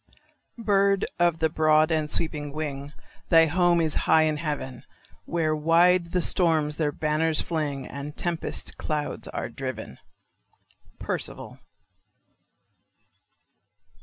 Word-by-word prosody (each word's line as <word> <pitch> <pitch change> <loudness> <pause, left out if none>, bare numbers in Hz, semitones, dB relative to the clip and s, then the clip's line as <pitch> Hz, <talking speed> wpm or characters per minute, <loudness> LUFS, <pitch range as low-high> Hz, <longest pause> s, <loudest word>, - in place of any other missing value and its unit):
Bird 200 -3 +2
of 175 -1 +2
the 160 - +2
broad 155 0 +3
and 155 -1 0
sweeping 150 -2 -1
wing, 145 -2 -5 0.4
Thy 165 -2 +6
home 175 +2 +2
is 160 -2 0 0.2
high 160 - +6
in 155 -1 0
heaven, 145 -5 -5 0.4
Where 160 -2 0
wide 170 +3 +3
the 180 -2 +1
storms 155 -4 +2
their 150 -2 0
banners 155 +1 0
fling, 145 -5 -2
And 140 +1 -7
the 150 - -10
tempest 170 -2 -2
clouds 150 -1 -3
are - - -4
driven. 130 -5 -7 1.0
_Percival. - - -3
155 Hz, 115 wpm, -25 LUFS, 150-170 Hz, 1.0 s, Thy